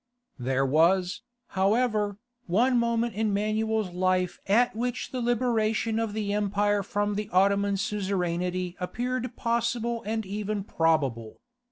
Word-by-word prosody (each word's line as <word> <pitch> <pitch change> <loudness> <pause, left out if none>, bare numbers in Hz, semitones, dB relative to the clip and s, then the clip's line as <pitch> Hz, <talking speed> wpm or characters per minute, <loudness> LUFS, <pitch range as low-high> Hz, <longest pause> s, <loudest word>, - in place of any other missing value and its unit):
There 130 +2 +1
was, 180 - +2 0.3
however, 210 +1 +1 0.3
one 240 +8 +3
moment 235 0 0
in 210 0 0
Manuel's 215 -1 0
life 185 0 0
at 230 +5 +3
which 245 +2 -3
the 255 - -3
liberation 225 -2 +1
of 225 -2 -2
the 210 -2 -2
empire 205 0 +1
from 205 +1 -1
the 210 0 -3
Ottoman 200 +1 +3
suzerainty 180 -3 -2
appeared 245 +6 -3
possible 235 0 -1
and 220 +1 -2
even 205 +1 -3
probable. 140 - 0
205 Hz, 125 wpm, -27 LUFS, 185-225 Hz, 0.3 s, one